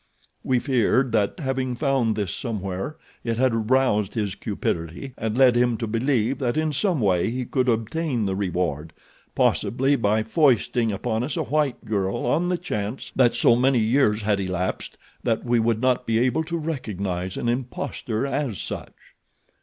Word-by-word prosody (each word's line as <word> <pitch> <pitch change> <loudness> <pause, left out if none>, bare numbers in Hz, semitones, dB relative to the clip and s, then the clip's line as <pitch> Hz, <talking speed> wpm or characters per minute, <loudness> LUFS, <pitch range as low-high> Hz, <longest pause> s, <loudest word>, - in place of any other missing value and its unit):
We 130 - +2
feared 130 0 +2
that 105 -3 +1
having 130 -2 -1
found 130 -5 +1
this 100 -5 -2
somewhere 100 +2 -4 0.3
it 115 -1 -1
had 130 -1 +2
aroused 115 -3 +1
his 105 -4 -1
cupidity 85 +11 -4
and 110 +1 -3
led 130 -2 +6
him 120 -1 +2
to 115 - -3
believe 120 +2 0
that 125 +1 -1
in 155 -1 0
some 175 +2 +1
way 95 -3 +2
he 125 +2 -3
could 130 0 0
obtain 120 +2 0
the 95 -1 -1
reward, 85 -5 -2 0.4
possibly 135 +4 +2
by 110 -2 +1
foisting 120 -2 +2
upon 110 +2 -2
us 130 +1 -3
a - - 0
white 145 -1 -1
girl 100 -3 -1
on 170 +8 +1
the 180 - +1
chance 105 -3 -4
that 125 -3 +4
so 120 - +5
many 130 +2 +3
years 110 -2 +2
had 105 -1 +1
elapsed 95 -1 -3 0.2
that 115 0 -1
we 120 -1 +2
would 115 -1 +1
not 130 -1 +1
be 115 -1 +2
able 130 +7 +2
to 170 +1 -3
recognize 100 - -3
an - - -2
imposter 120 -1 -2
as 135 -6 -2
such." - - -6
120 Hz, 170 wpm, -24 LUFS, 105-130 Hz, 0.4 s, led